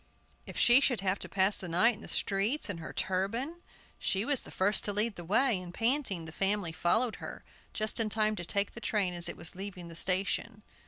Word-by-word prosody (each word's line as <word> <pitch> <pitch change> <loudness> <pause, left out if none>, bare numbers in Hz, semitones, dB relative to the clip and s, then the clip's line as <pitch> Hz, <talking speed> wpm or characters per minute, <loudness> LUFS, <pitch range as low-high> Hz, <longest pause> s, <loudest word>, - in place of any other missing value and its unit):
If - - -8
she 240 +2 +6
should 250 -6 +1
have 195 0 0
to - - -6
pass 195 +1 +3
the 180 - -7
night 185 +9 +4
in 215 - -12
the - - -9
streets 205 +5 0
in 170 - -6
her 160 - -7
turban! 230 - -2 0.4
She 195 +3 0
was 285 -1 +2
the - - -12
first 200 +3 +3
to 205 - 0
lead 210 +1 +2
the 175 - -8
way, 215 +3 +2
and, 175 -1 -9
panting, 225 - 0
the 160 - -8
family 195 -1 +1
followed 215 +9 +1
her, - - -8 0.3
just 215 +2 -1
in 225 -1 +3
time 215 0 +1
to 175 - -4
take 200 +3 0
the 235 - -9
train 200 -6 0
as 175 -1 0
it - - -6
was 160 - -6
leaving 185 -2 -7
the 165 - -10
station. 195 +5 0
200 Hz, 225 wpm, -31 LUFS, 185-225 Hz, 0.4 s, she